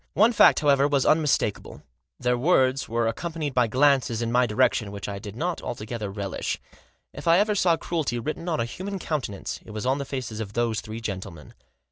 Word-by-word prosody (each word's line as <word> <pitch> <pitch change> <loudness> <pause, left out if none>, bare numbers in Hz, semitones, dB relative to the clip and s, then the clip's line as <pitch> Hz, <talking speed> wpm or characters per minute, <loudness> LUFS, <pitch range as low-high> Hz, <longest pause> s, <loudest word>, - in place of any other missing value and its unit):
One 225 +4 +5
fact, - - +6
however, 140 -1 +4
was 140 -2 +1
unmistakable; 150 -9 +1 0.4
their 125 0 +1
words 130 -1 +2
were 115 0 0
accompanied 155 +3 -3
by 125 -2 +3
glances 130 -2 +2
in 115 0 -2
my 125 +1 +3
direction, 110 -2 +1
which 100 -1 -6
I 100 -1 -5
did 105 0 -9
not 170 +7 -2
altogether 110 -2 -5
relish. 100 0 -3 0.5
If - - -8
ever 195 +6 +4
I - - +3
saw 180 -4 +3
cruelty 155 -9 -2
written 155 +8 -4
on 160 - 0
a 115 - +1
human 195 +10 -5
countenance 140 - -4
it - - -15
was 110 +2 -5
on 135 +2 +1
the 140 - -3
faces 125 -5 -5
of 105 -2 -5
those 115 -2 0
three 110 +2 -7
gentlemen. 95 -7 -6
125 Hz, 195 wpm, -25 LUFS, 110-155 Hz, 0.5 s, fact